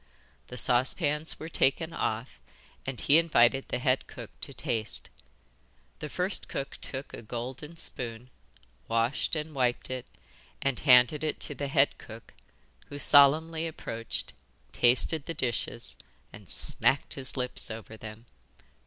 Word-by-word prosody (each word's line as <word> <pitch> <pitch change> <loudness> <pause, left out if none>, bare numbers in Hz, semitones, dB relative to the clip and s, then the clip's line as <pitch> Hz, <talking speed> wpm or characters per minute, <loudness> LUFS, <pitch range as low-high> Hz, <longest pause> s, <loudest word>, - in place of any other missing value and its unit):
The 125 - -8
saucepans 145 - +2
were 160 - -6
taken 160 +1 +1
off, 110 - -3 0.5
and 130 -3 -3
he 150 +3 +5
invited 135 -5 +3
the - - -1
head 130 +1 +1
cook - - -9
to - - -4
taste. 110 -2 -2 0.9
The 150 - -5
first 185 +5 -1
cook 135 - -4
took 135 +1 -5
a - - -7
golden 130 +8 -5
spoon, 120 -3 -4 0.6
washed 115 +7 0
and 155 0 -4
wiped 125 -2 0
it, 130 -1 -5 0.5
and 135 -3 -1
handed 125 +2 +5
it 155 - -1
to - - -1
the 140 0 -4
head 135 0 +2
cook, 115 0 -12 0.5
who 145 - -8
solemnly 155 +4 +5
approached, 115 -7 -5 0.4
tasted 130 +5 +2
the 165 - -4
dishes, 120 -1 -3 0.4
and 105 -4 -13
smacked 135 - +3
his 135 0 -3
lips 125 -1 -2
over 110 0 -8
them. 110 +1 -10
130 Hz, 135 wpm, -29 LUFS, 120-150 Hz, 0.9 s, he